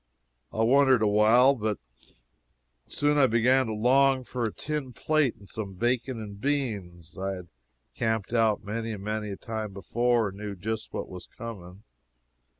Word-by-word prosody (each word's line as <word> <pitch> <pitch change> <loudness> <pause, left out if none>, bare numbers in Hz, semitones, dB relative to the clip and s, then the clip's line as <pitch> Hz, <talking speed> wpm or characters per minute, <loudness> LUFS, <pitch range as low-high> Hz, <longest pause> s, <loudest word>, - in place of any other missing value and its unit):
I 110 - 0
wondered 130 0 +5
awhile, 110 +6 +5
but 110 -5 -2 1.1
soon 145 0 +1
I 135 - +6
began 125 +3 +3
to 110 - -3
long 130 +4 +4
for 125 -1 -3
a 110 - -1
tin 145 -2 -4
plate, 155 -4 +1
and 100 - -17
some 100 -3 -6
bacon 120 +3 -1
and 100 -2 -8
beans. 100 - -3
I 95 +1 -2
had 90 -2 -9 0.5
camped 110 -1 -1
out 110 -3 +2
many 115 +2 -3
and 100 -2 -7
many 105 0 -3
a 100 - -5
time 110 -3 -5
before, 120 +2 +1
and 95 +1 -11
knew 105 -1 -5
just 110 +4 -4
what - - -4
was 90 -1 -10
coming. 100 -4 -9
110 Hz, 160 wpm, -27 LUFS, 105-125 Hz, 1.1 s, I